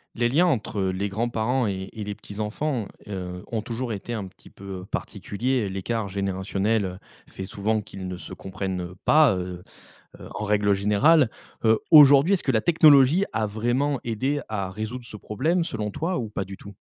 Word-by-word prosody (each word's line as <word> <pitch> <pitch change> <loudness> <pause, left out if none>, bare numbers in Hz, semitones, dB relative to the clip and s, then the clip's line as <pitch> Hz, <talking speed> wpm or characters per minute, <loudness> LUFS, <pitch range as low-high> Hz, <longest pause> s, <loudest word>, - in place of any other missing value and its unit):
Les 120 0 +2
liens 165 +9 +3
entre, 110 -7 -1
heu, 95 - +1
les 95 +2 -2
grands-parents 115 +3 0
et 95 -1 -3
et 110 - -6
les 105 0 -5
petits-enfants, 110 +4 -3 0.2
heu, 90 -3 -6
ont 115 -2 -1
toujours 115 +2 -4
été 105 +4 -5
un 105 -4 -3
petit 95 - -15
peu, 100 - -14 0.2
heu, - - -10
particuliers. 120 +1 -2
L'écart 100 +3 -2
générationnel, 100 +2 -1
heu, 90 -1 -5 0.3
fait 95 - -7
souvent 105 +3 -1
qu'ils 95 -2 -8
ne 90 -1 -5
se - - -8
comprennent, 95 -1 -4
heu, 90 +1 -7
pas, 150 -8 +5
heu 90 -1 -5 0.6
heu, - - -10
en 105 - -3
règle 105 -1 +2
générale. 110 +9 +4 0.4
Heu, 110 -1 +4
aujourd'hui, 145 +3 +8
est-ce 185 - -6
que 135 - +1
la 110 - +3
technologie 155 - +6
a 110 0 0
vraiment 120 +7 0
aidé 130 +6 -1
à 100 -3 -3
résoudre 110 +5 -5
ce 110 -2 -8
problème, 160 - 0
selon 105 -7 -3
toi, 175 - -2
ou 115 -3 -3
pas 100 -2 -3
du 95 +1 -8
tout? 100 +1 -12
110 Hz, 190 wpm, -25 LUFS, 100-130 Hz, 0.6 s, aujourd'hui